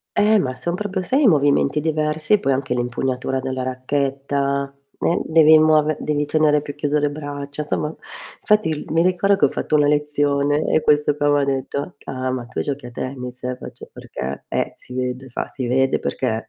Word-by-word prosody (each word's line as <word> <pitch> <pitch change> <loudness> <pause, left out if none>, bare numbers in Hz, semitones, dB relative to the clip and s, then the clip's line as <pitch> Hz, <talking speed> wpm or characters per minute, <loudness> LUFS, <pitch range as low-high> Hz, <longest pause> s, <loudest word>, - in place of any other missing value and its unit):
Eh, 210 0 +4
ma 130 -5 -2
son 170 +5 -3
proprio, 190 -1 -3
sai, 265 +10 +1
i - - +6
movimenti 145 -2 +3
diversi, 155 +4 +1
poi 135 - 0
anche 130 -1 -1
l'impugnatura 125 +2 -2
della 130 -1 -3
racchetta, 140 +1 -1 0.3
eh, 170 - +1
devi 160 -1 +6
muove 155 -1 +4
devi 150 -1 0
tenere 150 0 +3
più 145 -1 -7
chiuse 145 0 0
le 145 0 +1
braccia, 145 0 -6
somma, 150 +1 -2 0.5
fatti 210 -3 +3
il 155 -2 -2
mi 165 +1 +3
ricordo 195 +2 +2
che - - +4
ho - - +2
fatto - - -1
una 145 -1 +4
lezione 145 0 +1
e 155 - +2
questo 150 0 +2
qua 145 0 +1
m'ha 145 -1 +3
detto: 135 0 -2
"Ah 140 - -6
c - - -24
ah, 130 -1 -3
ma 130 -2 -3
tu 125 - -6
giochi 140 -3 -3
a - - -10
tennis?" 125 0 -6
E - - -2
io 125 - -2
faccio: - - -11
"Perché?" 65 +2 -6
"Eh, - - -1
si - - -12
vede." 130 +1 -3
Fa: 120 - -4
"Si 130 - -5
vede 130 +2 +2
perché" 115 -3 -2
145 Hz, 205 wpm, -21 LUFS, 130-155 Hz, 0.5 s, i